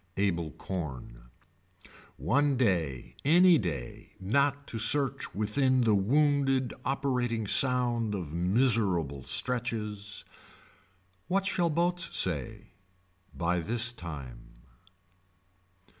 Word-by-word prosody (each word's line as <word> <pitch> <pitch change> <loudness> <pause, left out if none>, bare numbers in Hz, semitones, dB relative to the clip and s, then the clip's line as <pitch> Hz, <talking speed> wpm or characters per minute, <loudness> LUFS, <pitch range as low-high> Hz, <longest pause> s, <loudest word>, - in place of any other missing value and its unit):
Able 85 -5 0
corn. 65 -7 -7 0.9
One 140 - +1
day 80 - -1
any 175 +2 +6
day 70 - -6
not 140 +8 0
to 115 - -4
search 135 -2 +1
within 130 +5 +1
the 115 -3 +3
wounded 135 +4 +2
operating 125 -5 -1
sound 120 -2 +2
of 85 -6 -6
miserable 90 - +1
stretches. 105 - -2 1.0
What 195 +2 0
shall 175 -3 +1
boats 170 +1 +1
say. 75 -8 -1 0.7
By 90 +1 0
this 115 +7 0
time. 60 - -10
110 Hz, 90 wpm, -29 LUFS, 85-135 Hz, 1.0 s, any